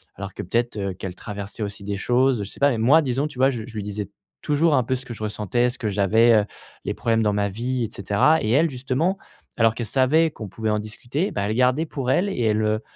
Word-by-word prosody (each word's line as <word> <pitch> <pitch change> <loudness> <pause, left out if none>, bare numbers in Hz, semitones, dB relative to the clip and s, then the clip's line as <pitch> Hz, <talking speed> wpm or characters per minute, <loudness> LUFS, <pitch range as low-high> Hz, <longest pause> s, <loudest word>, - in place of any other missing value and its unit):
alors 100 0 -7
que - - -5
peut-être, 115 +5 -1
heu, 100 -2 -2
qu'elle 90 0 -7
traversait 105 +2 -6
aussi 100 -1 -6
des 100 0 -3
choses, 125 +1 +2
je 100 - -7
sais - - -13
pas 140 - +5
même 115 -3 -1
moi 145 +8 +6
disons 135 0 -1
tu 135 - -11
vois? 135 +1 +5
J 120 -4 -5
je 120 - -11
lui 105 - -2
disais 105 -1 -5 0.3
toujours 150 +1 +2
un 130 - +3
peu 130 - -2
ce 130 - -6
que 120 - -7
je 110 - -7
ressentais, 110 +3 0
ce 125 - -8
que 110 - -1
j'avais, 105 +4 +4
heu, - - -4 0.4
les - - -1
problèmes 115 -1 +1
dans 105 -1 +2
ma 100 0 0
vie 120 +5 -2
et - - -7
cetera 100 - +2
et 110 - 0
elle 155 +7 +4
justement 135 +8 -1 0.4
alors 115 -1 +4
qu'elle 120 -3 -4
savait 140 +7 +3
qu'on 110 -7 -8
pouvait 110 +2 -3
en 105 - +1
discuter, 125 - -3
ben, 100 - -2
elle 110 +2 -1
gardait 125 +5 +2
pour 130 -3 -2
elle 195 +7 +2
et 160 - -3
elle, 110 0 +2
heu, 110 +1 0
115 Hz, 265 wpm, -23 LUFS, 105-130 Hz, 0.4 s, moi